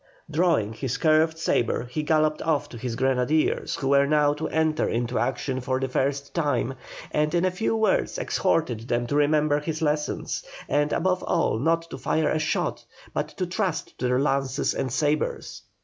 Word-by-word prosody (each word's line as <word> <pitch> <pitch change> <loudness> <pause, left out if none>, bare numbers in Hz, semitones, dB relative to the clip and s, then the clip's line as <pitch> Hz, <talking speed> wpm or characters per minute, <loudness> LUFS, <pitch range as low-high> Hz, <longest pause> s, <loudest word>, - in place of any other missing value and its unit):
Drawing 155 - +2
his 125 +2 -3
curved 160 0 +3
sabre 120 -6 0
he 125 +5 -3
galloped 155 0 +1
off 155 -3 0
to 120 - -9
his 120 0 -3
grenadiers, 130 +4 +1
who 135 - -2
were 140 0 +4
now 150 -1 +3
to 150 +2 -3
enter 160 -1 +1
into 120 +1 -1
action 130 -2 -1
for 130 +1 -1
the 135 - -1
first 140 +2 -1
time, 145 -5 0 0.4
and 150 +2 +1
in 175 +1 +2
a 185 - +2
few 220 +5 -1
words 220 - +1
exhorted 125 - 0
them 120 0 0
to 145 - -2
remember 150 0 +3
his 155 +1 -4
lessons, 150 -1 -1 0.2
and, 145 0 +1
above 185 0 +1
all, 165 -10 +1
not 165 +4 +1
to - - -6
fire 155 -1 +1
a 155 - +1
shot, 155 +1 -1 0.3
but - - -1
to 185 - -4
trust 180 -2 -2
to 125 - 0
their 125 0 +2
lances 135 -1 0
and 130 - -2
sabres. 150 +3 -1
150 Hz, 180 wpm, -25 LUFS, 130-160 Hz, 0.4 s, were